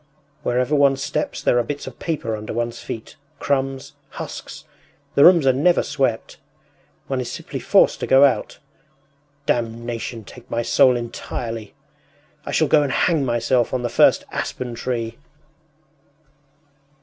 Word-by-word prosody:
“Wherever 125 +4 0
one 140 -2 +4
steps 150 +2 -3
there 120 - +3
are - - +1
bits 145 +4 -5
of - - -10
paper 135 -9 -2
under 105 0 -6
one’s 120 +1 -3
feet, 115 - -8 0.2
crumbs, 135 -1 -2 0.2
husks. - - -8 0.5
The 140 - +5
rooms 170 -5 +7
are 130 - +5
never 170 +7 +3
swept! 120 -5 -2 0.7
One 135 -2 -2
is 125 - -5
simply - - -6
forced - - +3
to - - -3
go 135 +2 +7
out. 125 -6 0 0.9
Damnation 115 -1 -3
take 120 +4 -14
my 120 0 -1
soul 125 +2 +4
entirely! 115 -2 -6 0.7
I - - -3
shall - - +2
go 155 - +5
and 140 -2 -1
hang 160 -1 +2
myself 120 0 +1
on 125 - -2
the 120 - -1
first - - +4
aspen 125 -2 -4
tree! 115 -1 -3
125 Hz, 145 wpm, -21 LUFS, 115-135 Hz, 0.9 s, rooms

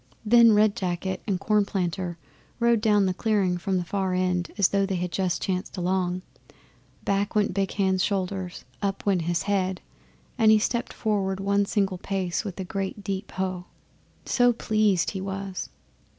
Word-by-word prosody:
Then 230 0 +7
Red 210 0 +4
Jacket 185 0 -2
and 190 -3 0
Cornplanter 190 -4 0 0.4
rode 235 -2 +3
down 210 -2 +4
the 185 - +1
clearing 190 -3 +1
from 190 +1 0
the 180 - -1
far 190 0 -1
end 180 -2 0
as 200 -3 +4
though 200 0 +2
they 195 -1 -1
had 180 0 -2
just 185 -2 -1
chanced 185 +1 -3
along. 180 0 0 0.8
Back 200 +1 0
went 210 -3 +2
Big 195 0 -1
Hand's 190 -2 +1
shoulders, 190 -2 -2 0.2
up 200 -1 -2
went 195 -4 +2
his 170 +1 -1
head, 190 -2 0 0.6
and 220 -1 +6
he 220 - +7
stepped 235 +2 -1
forward 195 -3 -1
one 200 +1 +1
single 195 -4 0
pace 185 -3 -2
with 195 -2 -6
a - - -2
great 195 +2 -4
deep 195 0 -3
Hough! 185 -1 -3 0.6
so 245 -1 +4
pleased 215 -5 +1
he 190 - -5
was. 195 -1 -5
195 Hz, 165 wpm, -26 LUFS, 185-205 Hz, 0.8 s, Then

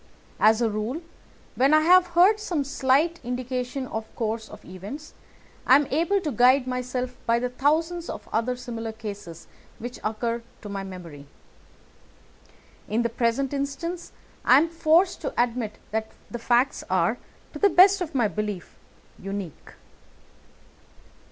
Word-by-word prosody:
As 220 +2 +4
a 230 - +2
rule, 225 +10 -3 0.5
when 275 +4 +4
I 310 - +5
have 360 +3 +6
heard 400 +5 +6
some 345 -8 -1
slight 285 +4 +1
indication 250 +1 -3
of 220 -3 -5
the - - -29
course 220 -1 -3
of - - -13
events, 205 - -9 0.5
I 260 - +8
am 290 +1 +4
able 340 +8 +2
to 310 -5 -2
guide 255 +3 +4
myself 250 0 -3
by 230 0 +4
the 250 +1 -1
thousands 325 +6 0
of - - -7
other 230 +3 0
similar 230 -2 -6
cases 205 -6 -8 0.3
which 245 +2 -7
occur 230 +2 -2 0.2
to 205 - -7
my 200 -1 -4
memory. 170 -7 -10 1.6
In 225 +3 +1
the 235 - 0
present 235 +4 0
instance 285 +5 -4 0.3
I 255 - +7
am 325 +4 +3
forced 330 +3 +2
to - - -4
admit 235 -3 0
that 220 0 -1 0.2
the 240 - -5
facts 245 +3 +1
are, - - +1 0.3
to - - -7
the 405 - +5
best 380 +2 +6
of 330 -4 -4
my 240 -4 +3
belief, 210 -3 -5 0.4
unique." 195 -4 -7
250 Hz, 150 wpm, -25 LUFS, 220-305 Hz, 1.6 s, I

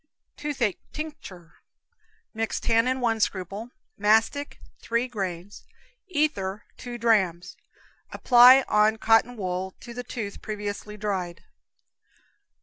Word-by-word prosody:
Toothache 270 -9 -2
Tincture. 200 - -9 0.8
Mix 225 0 -2
tannin, 250 +3 +1
1 225 -2 +1
scruple; 200 +3 -2 0.3
mastic, 220 +7 +2 0.2
3 235 +2 -1
grains; 195 -4 -6 0.4
ether, 255 - -1
2 245 -1 -7
drams. 190 -7 +1 0.6
Apply 250 +2 +7
on 215 +1 +3
cotton 225 +2 +3
wool, 185 -1 -4
to 235 - -9
the 245 +1 -6
tooth, 210 -5 -6
previously 210 0 -5
dried. 190 -5 -3
220 Hz, 100 wpm, -26 LUFS, 195-245 Hz, 0.8 s, Apply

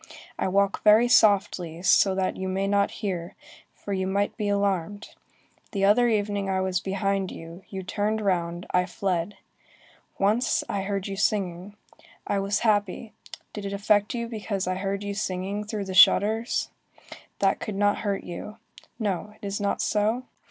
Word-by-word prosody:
I - - +1
walk 200 +1 +1
very 215 +3 +6
softly, 190 -7 +3
so 190 +1 +4
that 190 -1 0
you 190 0 -4
may 190 +1 -1
not 200 0 +2 0.2
hear, 180 -1 -3 0.4
for 200 - -6
you 190 -1 -1
might 200 +1 0
be 210 -3 -2
alarmed. 200 0 -1 0.6
The 195 -1 +1
other 240 +4 +4
evening 205 -2 0
I 190 0 +1
was 185 -1 0
behind 195 0 -1
you, 165 +2 -10
you 190 -1 -5
turned 210 +3 -1
round, 175 -3 -1
I 180 0 +2
fled. 185 0 -2 0.8
Once, 215 +5 +2
I 200 - -2
heard 195 -1 -3
you 195 - -4
singing. 195 -1 -1 0.5
I 200 - 0
was 200 +1 0
happy. 210 +1 0 0.4
Did 210 - -6
it 200 0 -4
affect 205 +2 +2
you 235 -1 -3
because 210 -4 -3
I 185 - -1
heard 195 +1 -3
you 205 0 -3
singing 200 0 -3
through 210 -2 -4
the 190 - -5
shutters? 220 +5 +4 0.7
That 195 -1 +2
could 210 - -5
not 205 +1 +2
hurt 200 -2 -2
you. 210 +5 -8 0.4
No, 210 -1 -3
it - - -9
is 200 +1 -3
not 200 - 0
so? 215 +4 +1
200 Hz, 165 wpm, -26 LUFS, 190-210 Hz, 0.8 s, very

